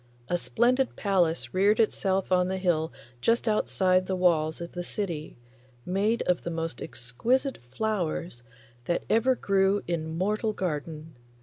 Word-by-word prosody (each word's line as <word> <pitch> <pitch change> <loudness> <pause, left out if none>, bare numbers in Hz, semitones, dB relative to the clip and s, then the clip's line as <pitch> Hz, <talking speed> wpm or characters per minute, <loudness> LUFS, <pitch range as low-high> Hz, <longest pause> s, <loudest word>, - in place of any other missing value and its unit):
A 175 - +2
splendid 250 +7 +1
palace 170 - +1
reared 200 +3 +3
itself 195 -4 +1
on 180 -1 +4
the 190 0 -2
hill 170 -4 +1 0.3
just 230 - +2
outside 185 -3 +2
the 190 - 0
walls 160 -4 +2
of 170 0 -6
the 175 - -5
city, 170 -8 -4 0.5
made 205 +5 +1
of 180 -1 +1
the - - -4
most 165 -5 -4
exquisite 245 - -1
flowers 170 - -2 0.4
that 170 - 0
ever 240 +4 +4
grew 195 -2 +2
in 160 -2 -3
mortal 215 +4 0
garden. 155 -3 -4
185 Hz, 140 wpm, -27 LUFS, 165-210 Hz, 0.5 s, on